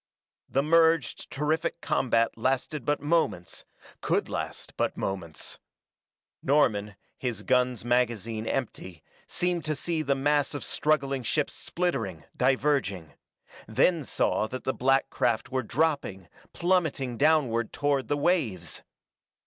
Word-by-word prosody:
The 135 - +1
merged, 165 -3 +3
terrific 155 +3 -1
combat 115 -6 +1
lasted 130 +3 -1
but 145 0 +1
moments; 145 - 0 0.4
could - - 0
last - - -5
but - - -1
moments. 85 -5 -4 0.8
Norman, 105 -8 +2 0.2
his 115 -5 -3
gun's 125 -2 +1
magazine 115 -2 0
empty, 95 - -4 0.2
seemed 175 -1 -1
to 155 -1 0
see 160 +4 -1
the 140 -3 +1
mass 145 +1 +1
of 145 - -4
struggling 140 -3 0
ships 145 +5 -1
splittering, 115 - -2
diverging; 130 - +1 0.5
then 145 +9 +2
saw 110 - 0
that 130 +3 -6
the 130 - 0
black 135 +1 +2
craft 115 +1 0
were 130 0 +1
dropping, 130 - -1 0.2
plummeting 160 -8 0
downward 135 -5 +2
toward 145 -2 0
the 145 - 0
waves! 135 - 0
135 Hz, 120 wpm, -28 LUFS, 115-150 Hz, 0.8 s, merged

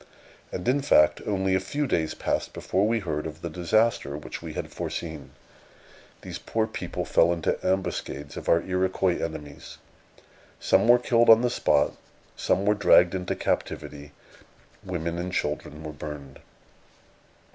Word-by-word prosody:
And, 90 - -5
in 135 +3 +3
fact, 75 - +4
only 95 -2 0
a 95 - +3
few 145 +10 -2
days 80 - -1
passed - - -2
before 95 +3 0
we 115 0 +1
heard 80 -4 -3
of 80 +1 -10
the 85 - -4
disaster 90 -4 +1
which 75 - -8
we - - -7
had - - -5
foreseen. 80 -3 -5 0.9
These - - -6
poor 110 -1 -1
people 110 - -5
fell 85 - +4
into 85 -2 -1
ambuscades 85 -6 -2
of - - -5
our 85 0 +4
Iroquois 95 -1 0
enemies. 75 -3 -7 0.8
Some - - +3
were 120 +1 +8
killed 120 -1 +3
on 115 0 +9
the 120 - +1
spot; - - +2 0.4
some 100 - 0
were 105 - +4
dragged 95 -3 +5
into 90 -1 -2
captivity; 70 0 -3 0.7
women 85 -2 -3
and 90 +1 -3
children 75 -2 -3
were 75 0 -6
burned. 75 -3 -8
90 Hz, 150 wpm, -26 LUFS, 75-105 Hz, 0.9 s, on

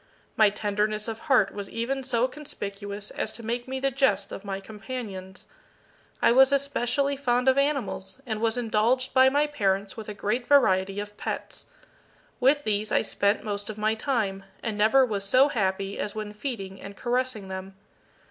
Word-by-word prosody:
My 215 -2 +6
tenderness 210 +1 -1
of 225 -1 -4
heart 260 -9 +3
was 200 -1 -6
even 260 +4 -2
so 250 -1 +1
conspicuous 205 -7 -6
as - - -3
to 230 - -8
make 240 +2 -2
me 265 0 -3
the 275 +1 +1
jest 205 -7 +1
of 195 - -7
my 195 -1 -4
companions. 200 -3 -7 0.8
I - - +6
was 265 +3 +6
especially 280 0 +1
fond 250 -2 0
of 260 - +6
animals, 275 -7 -1
and 220 -3 -3
was 230 +1 +1
indulged 240 +2 +1
by 260 0 +7
my 290 +2 +2
parents 200 -9 -1
with 220 -2 -8
a 210 - -5
great 235 +5 -2
variety 195 -8 +4
of 205 0 -7
pets. - - -5 0.7
With 280 +3 +4
these 215 -1 -1
I - - +3
spent 200 +2 +1
most 205 -1 -4
of 215 - -6
my 215 +1 +1
time, 220 -5 -1 0.2
and 225 -3 -2
never 225 +6 +5
was 205 -5 -2
so 255 +8 +5
happy 195 -4 -1
as 205 - -3
when 215 -1 -5
feeding 210 -5 -5
and 200 0 -9
caressing 245 -4 -1
them. 190 0 -7
220 Hz, 175 wpm, -26 LUFS, 200-260 Hz, 0.8 s, by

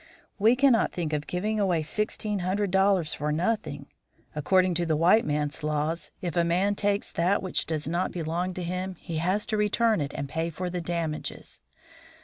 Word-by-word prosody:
We 225 +4 +5
can 275 +1 +5
not 225 - +2
think 165 -3 -3
of 150 0 -2
giving 210 +4 -1
away 180 -6 +2
sixteen 210 +3 -2
hundred 190 +2 -1
dollars 190 -4 +3
for 150 +1 -2
nothing. 165 -4 -1 0.5
According 185 +4 +2
to 170 +1 +1
the 160 - +2
white 180 +8 +5
man's 150 +1 -1
laws, 150 +2 -1
if 175 -4 -3
a 170 - +3
man 180 +4 +2
takes 205 0 0
that 180 +5 +1
which 185 - -1
does 155 -2 -2
not 175 +3 0
belong 175 +2 -2
to 180 - -4
him, 185 +2 -3
he 165 -1 -6
has 185 +6 0
to 215 - -1
return 210 -1 +2
it 145 0 -3
and 140 - -3
pay 160 +3 -2
for 180 +2 -4
the 180 0 -3
damages. 165 -2 -4
180 Hz, 190 wpm, -27 LUFS, 160-200 Hz, 0.5 s, We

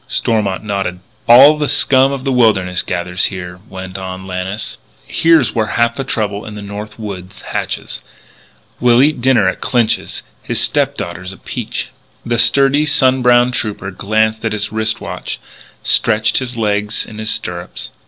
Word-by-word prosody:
Stormont 105 -7 -1
nodded. 100 -4 -3 0.3
"All 140 +6 +8
the 150 - 0
scum 135 0 +4
of 135 -2 -4
the 135 - 0
wilderness 100 -7 +2
gathers 90 +1 0
here," 90 -2 -6
went 95 0 -7
on 95 0 -6
Lannis. 95 +3 -4 0.3
"Here's 160 -9 +3
where 110 -2 0
half 115 0 +2
the 135 - -3
trouble 105 -5 -2
in 105 - -8
the 105 - -7
North 105 +1 -7
Woods 95 -4 -8
hatches. - - -4 0.8
We'll 120 +1 +5
eat 145 -3 +1
dinner 120 -6 +3
at 95 - -2
Clinch's. 120 -3 0 0.2
His - - -1
stepdaughter 85 +1 0
is 90 +1 -7
a - - -13
peach." - - -5 0.4
The 120 -1 0
sturdy, 140 +4 +4
sun 130 -3 +4
browned 125 0 +4
trooper 105 -5 -3
glanced 110 +3 0
at 110 -1 -1
his 105 0 -3
wrist 110 0 -1
watch, - - -5 0.4
stretched 110 0 +2
his 125 -2 -5
legs 105 -1 0
in 110 - -10
his 110 0 -3
stirrups. 90 -4 -4
110 Hz, 165 wpm, -16 LUFS, 95-125 Hz, 0.8 s, All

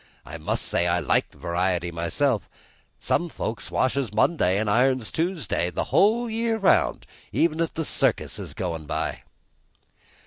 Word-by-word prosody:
I - - -8
must - - -1
say 85 - +1
I 85 0 +2
like - - +1
variety 90 0 -1
myself; 95 - 0 0.5
some 175 - 0
folks 110 -7 -5
washes 130 -1 0
Monday 105 - +2
an' 110 +1 0
irons 125 +1 +2
Tuesday 160 - -1
the 85 - -2
whole 225 +5 +4
year 225 0 0
round, 200 -4 +2 0.3
even 165 -1 +1
if 165 -1 -1
the 160 - -2
circus - - 0
is - - -7
goin' 85 -4 -4
by!" - - -2
125 Hz, 145 wpm, -25 LUFS, -, 0.5 s, whole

